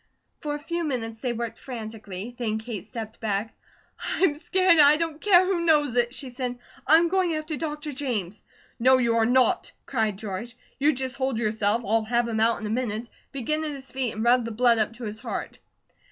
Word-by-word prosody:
For 295 -1 -3
a - - -5
few 340 +3 -3
minutes, 225 -7 -3
they 250 - -1
worked 235 -1 -4
frantically. 220 -3 -7
Then 220 -3 -1
Kate 220 -3 -6
stepped 225 -2 -7
back. 215 0 -2 0.6
"I'm 370 -5 +3
scared, 360 +4 +2
and - - +11
I 295 +1 +7
don't 325 -2 -3
care 370 -3 +6
who 370 -2 0
knows 295 -6 +3
it," 240 -1 +2
she 265 -3 -6
said. 250 -1 -4 0.3
"I'm 325 +4 +6
going 360 -2 +1
after 310 0 -3
Dr. 300 0 -4
James." 230 -9 -3 0.4
"No, 260 +2 +6
you 235 -2 +2
are 225 -1 +3
not!" 255 +1 +3
cried 220 -6 -1
George. 215 +4 -6 0.2
"You 290 +3 +4
just 260 -1 -4
hold 265 -3 0
yourself. 220 0 +1
I'll 220 +2 +1
have 240 +1 +1
him 225 -1 -1
out 230 +1 +3
in 220 - -6
a - - -3
minute. 230 -1 -2 0.2
Begin 305 +4 -1
at 310 - -1
his 275 -2 -7
feet 260 -4 -2
and 220 - -2
rub 245 +1 +4
the 230 - -4
blood 230 +1 +3
up 215 +1 +1
to 240 +2 -10
his 215 0 -5
heart." - - -5
245 Hz, 210 wpm, -26 LUFS, 225-295 Hz, 0.6 s, and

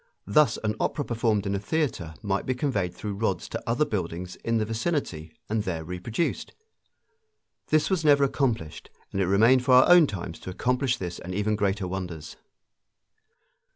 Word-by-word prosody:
Thus 140 +10 +3
an 110 -1 0
opera 145 - -1
performed 110 -3 0
in 100 - -1
a 100 - -1
theater 105 - -2
might 100 -1 -1
be 130 - 0
conveyed 100 - -1
through 105 +3 -5
rods 100 -4 -1
to - - -4
other 120 +6 +2
buildings 90 - -4
in 115 0 -1
the 110 - 0
vicinity 110 - -3 0.2
and 110 0 0
there 85 -5 -3
reproduced. 90 - -3 1.1
This 155 +4 +2
was 180 -4 +1
never 145 -2 +5
accomplished, 120 - -1 0.2
and 95 - -1
it 95 - +1
remained 115 +7 +4
for 125 0 +5
our 130 - +7
own 175 -3 +7
times 85 -6 -6
to - - -8
accomplish 125 +6 0
this 90 -2 -5
and 90 +1 -6
even 105 +1 0
greater 100 -2 -1
wonders. 90 -4 -6
105 Hz, 170 wpm, -26 LUFS, 90-130 Hz, 1.1 s, our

